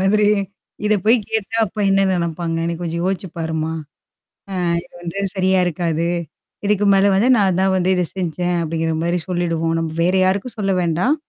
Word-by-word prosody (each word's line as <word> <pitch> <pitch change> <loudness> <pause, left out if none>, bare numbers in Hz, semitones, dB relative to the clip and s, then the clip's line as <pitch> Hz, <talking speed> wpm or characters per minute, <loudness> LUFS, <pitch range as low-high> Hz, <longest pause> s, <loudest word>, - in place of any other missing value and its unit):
மாதிரி. 205 +2 +3 0.6
இத 210 0 +3
போய் 225 +3 +6
கேட்டா 220 0 -2
அப்ப 215 +3 -11
என்ன 195 - +4
நெனப்பாங்க? 170 -2 -1
என்ன 170 0 -1
கொஞ்சம் 170 0 -3
யோசிச்சு 190 0 -2
பாருமா? 160 -1 -2 0.8
அ - - -4 0.3
இது 175 - -22
வந்து 175 +2 -6 0.2
சரியா 190 0 +2
இருக்காது. 170 -1 -1 0.6
இதுக்கு 205 0 +2
மேல 195 +1 +4
வந்து 210 +6 +3
நான் 190 -4 +2
தான் 190 0 +2
வந்து 185 0 +1
இத 180 - +1
செஞ்சேன். 175 -1 -1
அப்டிங்கிற 165 0 -1
மாரி 170 +1 0
சொல்லிடுவோம். 165 -2 0
நம்ம 165 -1 -2
வேற 180 +2 +2
யாருக்கும் 200 +6 -1
சொல்ல 195 -2 +1
வேண்டாம்? 175 - +1
180 Hz, 170 wpm, -20 LUFS, 165-195 Hz, 0.8 s, போய்